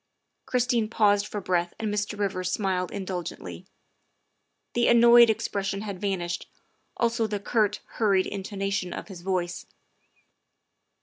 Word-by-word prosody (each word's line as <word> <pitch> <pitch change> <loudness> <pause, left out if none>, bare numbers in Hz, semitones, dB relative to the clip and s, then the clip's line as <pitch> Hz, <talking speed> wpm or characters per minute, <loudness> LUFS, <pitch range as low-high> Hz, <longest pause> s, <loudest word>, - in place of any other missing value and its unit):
' - - -53
' - - -52
Christine 245 -3 +1
paused 205 -2 +3
for 210 - -4
breath 175 -2 0
and 215 -2 -2
Mr. 210 0 -2
Rivers 185 -3 -1
smiled 185 -3 0
in 195 - -5
dulgently. 165 - -6 1.1
The 240 0 +2
annoyed 235 0 +7
expression 200 -2 -1
had 200 -4 -6
vanished, 180 -4 -2 0.5
also 230 -1 +1
the 205 -1 -3
curt, 205 0 0
hurried 200 -4 +1
intonation 195 -1 -3
of - - -7
his 185 -3 -9
voice. 180 -1 -2
200 Hz, 135 wpm, -26 LUFS, 185-220 Hz, 1.1 s, annoyed